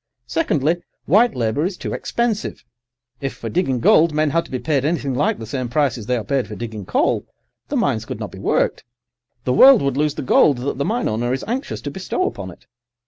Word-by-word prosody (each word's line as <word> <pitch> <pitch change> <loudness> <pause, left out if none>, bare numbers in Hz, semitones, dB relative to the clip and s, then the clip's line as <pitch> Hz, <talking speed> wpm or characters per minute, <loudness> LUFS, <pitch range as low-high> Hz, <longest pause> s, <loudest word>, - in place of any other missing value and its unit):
Secondly, 165 - +1 0.3
white 225 +5 +4
labour 115 +4 0
is 180 +1 -2
too - - -5
expensive. 235 -3 -2 0.6
If 135 -1 -4
for 115 - -6
digging 135 - 0
gold 160 +6 +5
men 155 -1 +2
had 165 +2 +1
to - - -14
be 130 - -2
paid 140 0 0
anything 145 -3 -1
like 140 +4 +1
the 115 - -7
same 125 +2 -3
prices 120 -5 0
they 125 - +1
are 115 - -3
paid 130 +5 -1
for 105 - -7
digging 110 -3 -6
coal, - - +1 0.4
the - - -3
mines - - 0
could - - -6
not - - -5
be - - -10
worked. - - 0 0.6
The 125 - 0
world 260 - +8
would 140 -1 0
lose 150 0 +1
the - - -4
gold 135 +1 +4
that 130 +2 -3
the 140 - 0
mine 235 +3 0
owner 120 +3 -1
is 130 - -3
anxious 250 +5 -3
to 145 - -5
bestow 190 +5 -2
upon 95 -2 -4
it. 85 - -15
140 Hz, 220 wpm, -20 LUFS, 120-165 Hz, 0.6 s, world